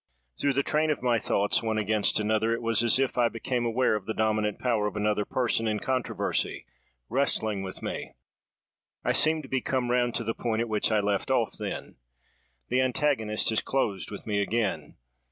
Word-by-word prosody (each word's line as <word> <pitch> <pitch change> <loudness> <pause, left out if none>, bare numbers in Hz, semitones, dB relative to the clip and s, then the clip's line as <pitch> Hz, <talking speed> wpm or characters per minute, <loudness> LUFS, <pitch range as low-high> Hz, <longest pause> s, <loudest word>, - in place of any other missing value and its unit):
Through 140 - +2
the 140 +1 +1
train 155 +2 +1
of 150 -4 -1
my 120 -2 +3
thoughts, 100 -1 +1
one 110 -1 -1
against 110 0 +2
another, 110 +1 +1
it - - -6
was 115 -1 +2
as 120 0 +4
if 135 -2 0
I 120 -1 +4
became 120 +1 -2
aware 120 +1 +2
of 105 -3 -5
the 110 - -2
dominant 110 -1 +1
power 115 -4 +1
of 105 - -5
another 105 0 0
person 115 -3 0
in 105 -1 0
controversy, 130 0 -1 0.4
wrestling 110 -5 0
with 95 -1 -6
me. - - -5 0.9
I - - +3
seem 155 0 +3
to - - -10
be 130 -1 -1
come 125 -2 -1
round 120 -1 +1
to 115 - -1
the 115 0 -1
point 115 -1 -1
at 120 - -2
which 110 +1 +1
I 110 -1 +3
left 100 -1 -1
off - - +1
then. - - -5 0.7
The 130 +1 +2
antagonist 125 -5 +1
has 110 - +2
closed 105 -8 -1
with 100 - -8
me 105 -2 0
again. 100 -8 -1
115 Hz, 195 wpm, -27 LUFS, 105-125 Hz, 0.9 s, as